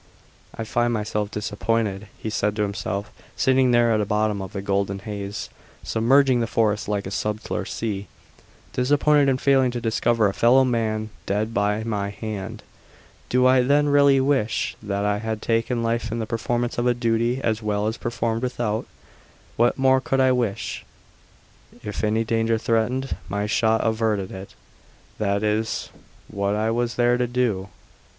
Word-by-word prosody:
"I 115 - -4
find 120 +2 0
myself 105 -2 -2
disappointed," 105 -1 -2
he 110 - -5
said 105 0 0
to 105 - 0
himself, 100 0 -3 0.2
sitting 130 -1 +3
there 120 -1 +4
at - - +3
the 105 - 0
bottom 105 -1 0
of 95 +1 -7
the 100 -3 -4
golden 100 0 0
haze 100 0 -5 0.4
submerging 130 +3 +3
the 115 - 0
forest 110 -2 0
like 100 -1 -1
a 95 - -5
subtler 105 +1 -3
sea 100 -3 -4 0.7
"disappointed 145 +2 +3
in 130 - +2
failing 135 -1 +3
to 120 0 -3
discover 115 -1 +2
a 100 - -1
fellow 125 +5 +5
man 110 -3 -1 0.2
dead 105 +3 -1
by 105 0 0
my 105 -3 -2
hand! 105 -1 -6 0.7
Do 125 0 +3
I 130 0 +5
then 145 +3 +3
really 140 -1 +5
wish 130 -5 0
that 100 -1 -2
I 105 0 +1
had 110 0 -3
taken 115 +2 0
life 115 0 -1
in 115 - -2
the 115 - -2
performance 120 +2 -2
of 120 - +1
a 120 - +3
duty 115 +1 0
as 110 -3 -1
well 105 0 -1
performed 115 -1 -2
without? 120 -4 -2 0.7
What 120 +1 +2
more 130 0 +4
could 135 +1 0
I 130 -1 +4
wish? 120 -6 -2 1.0
If 105 +1 -5
any 110 +1 +2
danger 115 0 +1
threatened, 120 +4 0
my 100 +1 -1
shot 110 +1 +2
averted 110 -4 0
it; 95 +1 -9 0.6
that 100 -1 0
is 110 +1 -1 0.4
what 100 0 -1
I 110 +1 0
was 120 +1 -1
there 120 0 +3
to 125 - +1
do. 115 -6 -1
115 Hz, 165 wpm, -23 LUFS, 105-120 Hz, 1.0 s, fellow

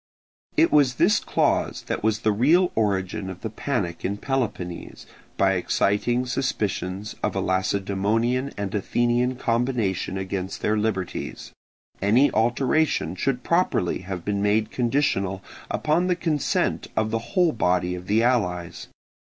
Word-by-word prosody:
It 330 - +5
was 140 -4 +4
this - - +4
clause - - 0
that - - -3
was 110 0 +1
the 110 - +2
real 160 - +3
origin 95 -3 -1
of 95 -1 -8
the 110 - -4
panic 105 -8 -3
in 100 +2 -1
Peloponnese, 105 -10 -3 0.3
by 95 0 +4
exciting 105 +6 +1
suspicions 105 -6 -2
of - - -1
a - - 0
Lacedaemonian 100 +7 0
and 100 -2 -3
Athenian 120 +4 +1
combination 115 -7 -1
against 95 0 -4
their 110 - +2
liberties: 105 -4 -3 0.5
any 120 +8 +4
alteration 125 - +1
should 125 +5 -1
properly 170 - +1
have 95 -2 -6
been 100 -1 -1
made 105 +2 +1
conditional 115 -7 0 0.3
upon 160 +4 +1
the 180 - +2
consent 160 -4 0
of 110 0 +1
the 115 - 0 0.2
whole 175 -3 +5
body 90 -5 +1
of 90 0 -7
the 110 +3 +3
allies. 90 -9 0
110 Hz, 135 wpm, -24 LUFS, 95-125 Hz, 0.5 s, It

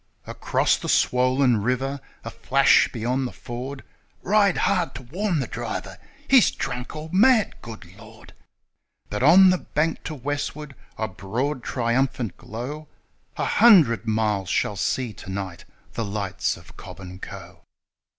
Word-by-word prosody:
Across - - 0
the - - -6
swollen 125 -1 +3
river 130 +5 -1 0.3
a - - -5
flash 135 +1 +3
beyond 125 +3 -1
the - - -8
ford: 130 +3 -7 0.2
' - - -39
Ride 200 -3 +4
hard 180 -8 0
to 130 - -8
warn 175 - -2
the 135 - -1
driver! - - -6 0.3
He's 265 -3 +6
drunk 125 +3 -5
or 155 +1 -7
mad, 220 +3 +4
good 115 -5 -10
Lord! 110 +1 -15 0.4
' - - -48
But 105 - -3
on 185 +7 +7
the 185 - +1
bank 155 +2 -2
to 155 - -4
westward 145 +1 -4 0.2
a 110 - -2
broad, 120 +9 -3
triumphant 125 -1 -1
glow 140 +8 -7 0.5
A - - -1
hundred 155 - +5
miles 105 -4 0
shall 105 - 0
see 120 +3 -2
to 95 - -11
night 95 -2 -6 0.3
the 115 - -3
lights 100 -2 -2
of - - -16
Cobb - - -11
and 90 0 -10
Co. - - -10
130 Hz, 150 wpm, -24 LUFS, 110-150 Hz, 0.5 s, on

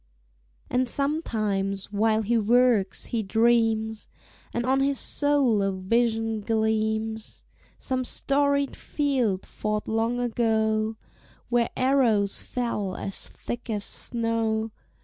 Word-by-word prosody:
And 250 0 0
sometimes, 215 - -1
while 220 +1 +2
he 235 +3 +1
works, 230 -3 +2
he 230 - +1
dreams, 220 +1 +1 0.4
And 235 0 -2
on 265 +1 +2
his 275 0 +2
soul 280 -7 +3
a 195 0 +1
vision 225 +3 0
gleams: 220 0 -1 0.3
Some 255 -1 -2
storied 280 +2 0
field 255 -10 -1
fought 215 0 -3
long 225 +2 0
ago, 220 -2 +1 0.5
Where 240 -1 +2
arrows 245 -7 +2
fell 210 -6 -3
as 195 - -6
thick 240 +1 -7
as 210 -2 -1
snow. 225 -1 -1
225 Hz, 110 wpm, -26 LUFS, 215-245 Hz, 0.5 s, soul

